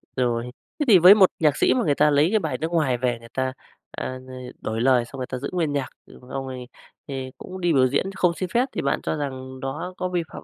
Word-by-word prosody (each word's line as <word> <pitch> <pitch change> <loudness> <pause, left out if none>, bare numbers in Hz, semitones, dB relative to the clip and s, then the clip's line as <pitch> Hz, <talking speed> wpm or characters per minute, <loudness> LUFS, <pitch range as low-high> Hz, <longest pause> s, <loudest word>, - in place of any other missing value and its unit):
Rồi. 120 -1 -1 0.3
Thế 295 - +1
thì 210 -6 +8
với 180 +4 +9
một 195 -3 +6
nhạc 150 -3 +3
sĩ - - +4
mà 250 - +1
người 145 -3 +2
ta 150 - +4
lấy 145 +3 +3
cái 215 +2 +2
bài - - -3
nước 160 +2 -3
ngoài 150 -7 +1
về, 120 -1 -1
người 115 0 -14
ta, 130 0 -1 0.4
à, - - -5
ưm, 130 0 -10 0.4
đổi 110 +1 -3
lời 125 -1 +3
xong 135 - -11
người 125 - -3
ta 130 - -4
giữ 140 +3 -5
nguyên 165 -5 0
nhạc, 140 -2 -2 0.2
xong 125 - -16 0.2
rồi 130 -1 -7 0.4
thì 130 -2 -5
cũng 185 0 -9
đi 175 -1 +2
biểu 130 -2 +4
diễn 140 +9 -1
không 180 -2 +2
xin 185 +1 -4
phép, 240 +7 +2
thì - - -3
bạn 140 - 0
cho - - -1
rằng 130 -3 -5
đó 150 +8 -5
có 185 - -2
vi 175 -2 -1
phạm - - -8
140 Hz, 265 wpm, -24 LUFS, 130-175 Hz, 0.4 s, với